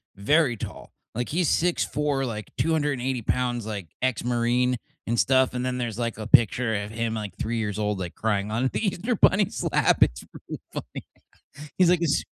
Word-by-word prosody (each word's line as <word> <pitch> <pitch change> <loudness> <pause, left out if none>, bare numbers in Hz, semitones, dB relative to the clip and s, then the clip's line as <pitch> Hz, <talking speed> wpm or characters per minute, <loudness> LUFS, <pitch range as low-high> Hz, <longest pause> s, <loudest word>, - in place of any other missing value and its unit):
very 135 +5 +3
tall, - - -8 0.2
like 120 +1 -2
he's 170 -1 +1
6'4, 150 -5 +1
like, 110 -3 -5
280 140 -6 0
pounds, 120 -1 -1
like, 100 -6 -5
ex-Marine 125 0 +1 0.3
and 115 0 0
stuff, 130 -1 +3
and 125 0 -2
then 125 0 -1
there's, 120 -2 -3
like, 115 -2 -2
a 110 0 -5
picture 115 +1 +4
of 100 +1 -3
him 115 0 -2
at, - - -2
like, 100 -3 -7
3 115 +1 -2
years 105 -2 -2
old, 105 -2 -1
like, 90 -2 -5
crying 105 -1 -1
on 125 +4 +1
the 220 - -1
Easter 220 +6 -1
Bunny's 200 0 +3
lap, - - +3
it's - - +3 0.2
really - - -6
funny. - - -7 0.7
He's, 180 -2 +5
like, 180 - +3
"It's 165 -4 +2
s" - - -10
120 Hz, 190 wpm, -25 LUFS, 110-140 Hz, 0.7 s, He's